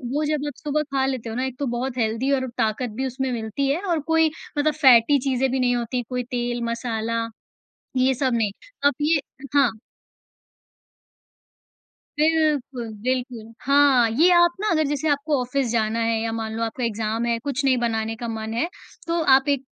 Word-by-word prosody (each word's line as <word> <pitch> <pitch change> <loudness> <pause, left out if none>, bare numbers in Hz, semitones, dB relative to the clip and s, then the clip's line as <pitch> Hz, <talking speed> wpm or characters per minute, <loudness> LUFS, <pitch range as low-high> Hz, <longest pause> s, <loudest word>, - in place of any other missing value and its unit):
वो 300 - +1
जब 300 -1 -1
आप 290 - -4
सुबह 300 0 0
खा 265 -1 +2
लेते 260 -4 -3
हो 220 - -5
ना 255 +2 -1
एक 260 -1 -5
तो 285 - -1
बहुत 255 +1 -3
हेल्दी 230 +3 0
और 260 -2 +1
ताकत 225 +2 0
भी 265 - 0
उसमें 260 +1 -3
मिलती 230 +3 -2
है 295 +6 0
और 350 -5 0
कोई 320 -1 +4 0.3
मतलब 300 +1 +2
फैटी 270 -1 +5
चीज़ें 265 0 0
भी 265 - 0
नहीं 245 -1 +2
होती, 245 +1 -2
कोई 250 -1 -2
तेल 240 0 -3
मसाला। 230 -1 -2 0.7
ये 260 +1 +3
सब 260 0 0
नहीं। 220 -3 +1 0.3
अब 285 - +5
ये 300 +1 +3 0.4
हाँ। 275 -3 +5 2.5
बिल्कुल, 300 -6 +1
बिल्कुल। 245 -3 -3
हाँ, 275 -4 +5
ये 305 +11 +4
आप 345 0 +5
ना 425 - -1
अगर 315 -2 +3
जैसे 290 +2 -1
आपको 290 0 +1
ऑफिस 255 +1 -1
जाना 225 0 0
है 225 -1 +1
या 225 0 -2
मान 225 -1 -4
लो 230 - -2
आपका 230 +3 -3
एग्जाम 225 0 -1
है, 235 -1 +1
कुछ 280 +2 -3
नहीं 260 -2 +4
बनाने 225 -2 -1
का 235 +1 -6
मन 220 0 -4
है 240 +9 0 0.4
तो 335 0 0
आप 270 +1 +2
एक 280 -2 +1
255 Hz, 190 wpm, -23 LUFS, 230-285 Hz, 2.5 s, फैटी